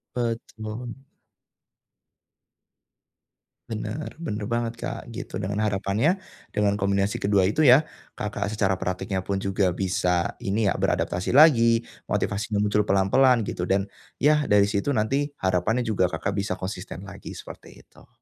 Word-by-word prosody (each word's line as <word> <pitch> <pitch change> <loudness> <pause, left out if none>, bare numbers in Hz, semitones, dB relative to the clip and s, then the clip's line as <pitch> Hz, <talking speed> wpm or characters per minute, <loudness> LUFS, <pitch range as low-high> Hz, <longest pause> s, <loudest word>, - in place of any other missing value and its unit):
Betul. 115 -1 -4 2.7
Benar, 110 +6 -5
benar 115 -11 -4
banget 115 0 -1
Kak, - - -4
gitu. - - -7
Dengan 100 +3 -2
harapannya 105 - +1 0.4
dengan 105 -1 +1
kombinasi 100 0 0
kedua 100 -1 +2
itu 125 +11 +3
ya, 130 +5 +8 0.3
Kakak 105 0 -3
secara 95 -3 +1
prakteknya 95 +1 -2
pun 100 - 0
juga 95 -2 +1
bisa, 90 -2 0
ini 100 0 +1
ya - - +1
beradaptasi 90 +7 0
lagi, 115 -6 +6 0.2
motivasinya 105 0 -1
muncul 105 0 +1
pelan-pelan 115 +6 +4
gitu, 90 -3 -3
dan, 95 +1 +2 0.4
ya 150 0 +4
dari 105 -1 +5
situ 115 +8 0
nanti, 135 +7 +1 0.2
harapannya 95 +6 +1
juga 105 -5 +1
Kakak 95 - -3
bisa 100 -2 -1
konsisten 95 -1 -6
lagi, 100 0 -9
seperti - - -12
itu. - - -21
105 Hz, 130 wpm, -25 LUFS, 95-115 Hz, 2.7 s, ya